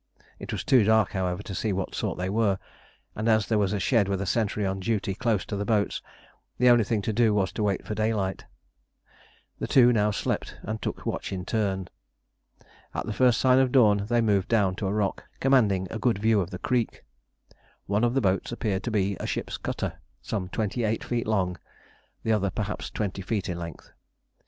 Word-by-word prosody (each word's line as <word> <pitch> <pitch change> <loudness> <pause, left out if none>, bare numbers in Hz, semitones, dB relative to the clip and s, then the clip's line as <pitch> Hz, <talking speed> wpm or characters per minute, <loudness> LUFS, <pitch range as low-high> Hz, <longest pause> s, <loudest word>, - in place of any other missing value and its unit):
It - - -7
was - - -3
too 125 -4 +5
dark, 110 -1 +3
however, 95 0 -2
to 100 - -7
see 110 - -1
of 95 - -1
what 95 - -3
sort - - -2
they 90 - -2
were, 100 -1 +1 0.6
and 110 +2 -1
as 110 -2 +4
there 110 -2 +1
was 100 -2 +1
a 105 - -1
shed 110 0 +2
with 100 -1 0
a 100 - -2
sentry 105 0 0
on 95 0 -1
duty 100 -1 -1
close 110 -2 0
to 105 - -4
the 100 - -2
boats, 105 -1 0 0.6
the 125 0 +5
only 120 -2 +5
thing 105 0 -1
to 110 - -1
do 110 -1 +3
was 95 -2 +1
to - - -4
wait 100 -3 0
for - - -3
daylight. 105 -3 -1 1.1
The - - -2
two 125 -2 +6
now 105 -2 +3
slept 105 - -2
and 110 +1 -4
took - - -4
watch - - -3
in 90 -2 -4
turn. 100 -5 -1 1.1
At - - -2
the 110 - -3
first 125 0 +3
sign 130 0 +5
of 130 -1 +3
dawn 105 -6 +4
they 120 0 +2
moved 100 -3 +2
down 100 -5 +2
to 100 - -2
a - - 0
rock, 105 -1 -1
commanding 105 -9 +3
a 110 - -4
good 115 -1 +2
view 110 0 +3
of 90 - -4
the 95 - -6
creek. 120 +3 -1 0.8
One 105 +3 0
of 120 +1 +2
the 135 - +3
boats 95 -1 0
appeared 105 -5 -1
to - - -1
be 100 -3 0
a - - -4
ship's - - -3
cutter, - - -4 0.2
some 90 0 -4
twenty 110 +4 -2
eight 110 0 0
feet 120 -2 -2
long, 95 -5 0 0.6
the 110 - 0
other 100 -2 +2
perhaps 105 +2 -4
twenty 100 -2 -3
feet 100 +1 -2
in 85 -1 -3
length. 85 -1 -8
105 Hz, 215 wpm, -26 LUFS, 95-115 Hz, 1.1 s, two